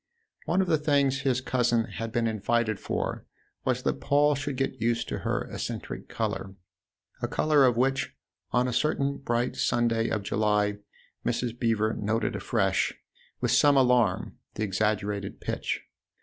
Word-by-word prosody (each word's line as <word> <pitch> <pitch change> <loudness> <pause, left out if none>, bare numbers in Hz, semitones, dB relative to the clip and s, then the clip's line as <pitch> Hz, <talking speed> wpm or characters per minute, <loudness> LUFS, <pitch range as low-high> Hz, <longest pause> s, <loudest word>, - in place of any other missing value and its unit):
One 185 +3 +2
of 190 - 0
the 160 -3 +3
things 140 -3 +2
his 130 -2 +1
cousin 120 -3 +2
had 115 0 -5
been 120 -1 +1
invited 110 0 0
for - - -3 0.4
was - - 0
that 70 - -1
Paul 145 +1 +4
should 145 0 -3
get 135 -4 -2
used 115 +1 +1
to - - -3
her - - -1
eccentric - - -5
colour 95 0 -3 0.7
a - - 0
colour 150 -3 +3
of 120 -2 +1
which, 135 +2 +1 0.3
on 125 +1 +2
a 125 - -2
certain 140 +1 +1
bright 120 -1 -1
Sunday 115 -1 +1
of 110 -2 -1
July, 105 0 +1 0.4
Mrs. 120 -1 -2
Beever 110 -2 +1
noted 110 +2 -1
afresh, - - +1 0.5
with - - +1
some 145 -1 +5
alarm, 125 -7 +2 0.2
the 110 - -2
exaggerated 105 0 -1
pitch. - - -3
120 Hz, 150 wpm, -28 LUFS, 110-135 Hz, 0.7 s, some